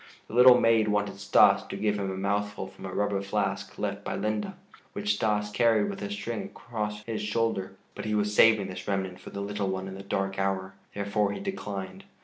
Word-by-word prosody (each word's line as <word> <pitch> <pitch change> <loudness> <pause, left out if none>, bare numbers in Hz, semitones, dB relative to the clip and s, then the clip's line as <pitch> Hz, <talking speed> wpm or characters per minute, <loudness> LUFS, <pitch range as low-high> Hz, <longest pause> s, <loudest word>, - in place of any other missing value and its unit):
The - - -12
little 125 +1 +8
maid 115 -1 +4
wanted 105 -1 0
Stas 100 0 +5
to - - -5
give 105 0 0
him 100 -1 -2
a 95 - -4
mouthful 100 0 -1
from 95 0 -9
a - - -6
rubber 100 0 0
flask 100 0 -2
left - - -3
by - - -3
Linde, 110 - -2 0.4
which 105 +1 0
Stas 105 0 0
carried 110 -2 +3
with 100 - -8
a 100 - -3
string 100 +2 -4
across 105 -2 -5
his 110 -1 -4
shoulder, 105 -3 -1 0.2
but - - -7
he 105 0 0
was 105 0 +1
saving 110 -2 +6
this 95 - -7
remnant 95 -2 -2
for - - -10
the 100 - -5
little 100 0 -2
one 95 0 -3
in 95 - -7
the 95 - -8
dark 95 0 -2
hour; 95 -1 -1 0.2
therefore 100 0 0
he - - -5
declined. 100 - -5
105 Hz, 210 wpm, -28 LUFS, 95-105 Hz, 0.4 s, little